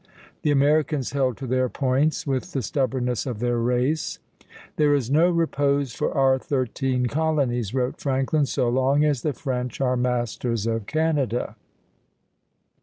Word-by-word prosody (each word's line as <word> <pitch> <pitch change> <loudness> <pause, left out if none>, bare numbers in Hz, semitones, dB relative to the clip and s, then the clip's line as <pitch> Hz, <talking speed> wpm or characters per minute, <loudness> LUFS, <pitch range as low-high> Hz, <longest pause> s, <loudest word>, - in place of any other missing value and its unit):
The 150 - 0
Americans 145 -1 +2
held 130 -4 0
to 135 - -6
their 130 0 +1
points 135 +4 0
with 140 +6 -2
the 135 - -1
stubbornness 125 0 -1
of 120 -4 -3
their 120 +1 0
race. 125 +6 0 0.6
"There 145 -1 +4
is 130 -3 -2
no 165 +5 +4
repose 145 -6 +1
for - - -1
our 135 -1 +4
thirteen 130 -1 -1
colonies," 130 -6 0
wrote 125 0 -1
Franklin, 135 +2 +1
"so 130 -2 0
long 130 +4 +2
as 145 -5 +1
the 150 - -1
French 125 -4 -4
are 130 -2 +1
masters 120 -2 -1
of 115 -2 -2
Canada." 150 -6 0
130 Hz, 145 wpm, -24 LUFS, 125-145 Hz, 0.6 s, There